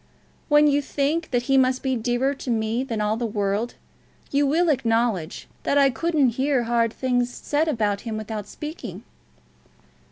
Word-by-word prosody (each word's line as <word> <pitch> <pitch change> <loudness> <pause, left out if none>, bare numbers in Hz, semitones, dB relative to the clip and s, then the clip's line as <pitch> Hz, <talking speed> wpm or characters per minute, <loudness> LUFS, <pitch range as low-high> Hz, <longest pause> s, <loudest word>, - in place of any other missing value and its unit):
"When 295 0 +6
you 290 -1 +3
think 290 +4 -1
that 245 -2 0
he 270 +1 +3
must 255 0 +1
be 265 -1 0
dearer 245 +4 0
to 270 - -8
me 225 +1 0
than 230 -5 -3
all 210 +1 0
the 235 0 -1
world, 205 +2 -1 0.6
you 285 0 +2
will 330 +4 +2
acknowledge 230 - 0
that 285 - +1
I 275 -1 +5
couldn't 310 -2 +2
hear 270 -3 +2
hard 230 -1 +1
things 245 0 0
said 295 +5 -1
of 210 -8 0
him 225 -2 -4
without 215 -1 -5
speaking." 305 +7 -7
250 Hz, 165 wpm, -24 LUFS, 225-285 Hz, 0.6 s, When